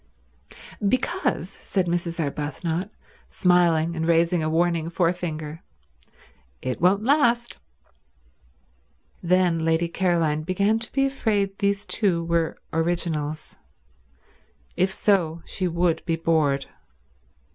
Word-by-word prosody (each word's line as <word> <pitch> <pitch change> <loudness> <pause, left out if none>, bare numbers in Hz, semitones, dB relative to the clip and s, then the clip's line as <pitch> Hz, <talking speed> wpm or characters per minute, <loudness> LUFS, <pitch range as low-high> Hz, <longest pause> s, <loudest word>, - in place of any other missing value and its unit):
"Because," 255 - -1
said 190 -3 -1
Mrs. 170 -1 -2
Arbuthnot, 160 +5 -3 0.4
smiling 170 -2 +2
and 160 0 -2
raising 170 +1 +3
a 155 - 0
warning 165 0 +1
forefinger, 165 -3 -2 1.0
"it 130 - -4
won't 195 +4 +3
last." 240 -3 +2 1.6
Then 175 -2 +2
Lady 165 +1 +2
Caroline 170 -4 +1
began 200 +6 +1
to 225 - -4
be 275 0 +2
afraid 210 -7 0
these 200 0 0
two 180 -6 +1
were 170 -1 0 0.2
originals. 160 -2 -2 1.2
If 185 - +2
so, 180 -5 +1
she 185 - -2
would 170 -1 0
be 165 - +1
bored. 155 -4 +1
170 Hz, 105 wpm, -24 LUFS, 160-190 Hz, 1.6 s, raising